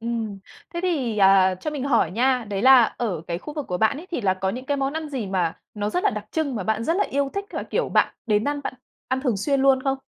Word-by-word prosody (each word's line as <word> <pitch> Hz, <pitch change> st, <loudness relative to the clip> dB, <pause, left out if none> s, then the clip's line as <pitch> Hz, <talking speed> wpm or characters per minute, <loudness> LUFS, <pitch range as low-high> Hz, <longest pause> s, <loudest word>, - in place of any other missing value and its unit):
Ừm. 225 Hz, -3 st, -3 dB, 0.4 s
Thế 345 Hz, -, -2 dB
thì, 265 Hz, -12 st, -1 dB
à, 190 Hz, -1 st, +5 dB
cho 245 Hz, +12 st, -5 dB
mình 280 Hz, -3 st, -4 dB
hỏi 230 Hz, -, +2 dB
nha, 250 Hz, +3 st, +1 dB
đấy 195 Hz, 0 st, -2 dB
là 260 Hz, -2 st, +8 dB
ở 215 Hz, -9 st, -3 dB
cái 170 Hz, 0 st, -3 dB
khu 300 Hz, +9 st, -9 dB
vực 295 Hz, -3 st, -4 dB
của 180 Hz, 0 st, -2 dB
bạn 220 Hz, +5 st, +2 dB
ấy 335 Hz, +5 st, -9 dB
thì 335 Hz, -, -2 dB
là 190 Hz, -3 st, +2 dB
có 190 Hz, 0 st, -2 dB
những 250 Hz, +5 st, -6 dB
cái 285 Hz, -, 0 dB
món 275 Hz, +1 st, -1 dB
ăn 315 Hz, -1 st, -4 dB
gì 255 Hz, -8 st, -4 dB
mà 180 Hz, -4 st, -1 dB, 0.2 s
nó 210 Hz, 0 st, -2 dB
rất 360 Hz, -, -1 dB
là -, -, +4 dB
đặc -, -, -6 dB
trưng 310 Hz, -5 st, -1 dB
mà 210 Hz, -, -2 dB
bạn 220 Hz, +2 st, 0 dB
rất 330 Hz, +2 st, +1 dB
là 410 Hz, -, +2 dB
yêu 280 Hz, 0 st, -1 dB
thích 400 Hz, 0 st, -2 dB
và, -, -, -3 dB
kiểu, -, -, -1 dB
bạn -, -, +2 dB
đến 210 Hz, 0 st, +2 dB
ăn 290 Hz, 0 st, -2 dB
bạn -, -, -3 dB, 0.3 s
ăn 260 Hz, 0 st, 0 dB
thường 250 Hz, -6 st, 0 dB
xuyên 275 Hz, +7 st, 0 dB
luôn 270 Hz, -1 st, +4 dB
không? 270 Hz, 0 st, 0 dB
250 Hz, 285 wpm, -24 LUFS, 205-280 Hz, 0.4 s, là